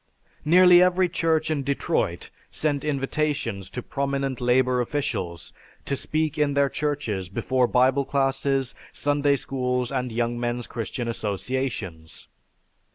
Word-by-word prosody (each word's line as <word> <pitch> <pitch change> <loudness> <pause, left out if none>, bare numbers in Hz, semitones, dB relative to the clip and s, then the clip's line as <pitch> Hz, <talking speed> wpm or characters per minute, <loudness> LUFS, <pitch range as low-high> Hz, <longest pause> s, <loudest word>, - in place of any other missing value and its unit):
Nearly 180 +2 +7
every 180 0 +4
church 160 -2 +1
in 150 -3 0
Detroit 140 +1 -1 0.2
sent 145 -3 -1
invitations 140 -8 -1
to 125 - -6
prominent 140 -2 -2
labor 125 0 +3
officials 95 - -3 0.3
to 140 - -1
speak 155 +2 -2
in 145 -1 +2
their 140 -1 +3
churches 135 -13 -2
before 125 +6 +1
Bible 130 +3 +3
classes, 135 -1 0 0.2
Sunday 145 0 +1
schools, 125 -2 -2
and 125 -2 -2
Young 120 +1 -1
Men's 120 0 -2
Christian 120 +1 -4
Associations. 105 -6 -4
135 Hz, 120 wpm, -25 LUFS, 120-145 Hz, 0.3 s, Nearly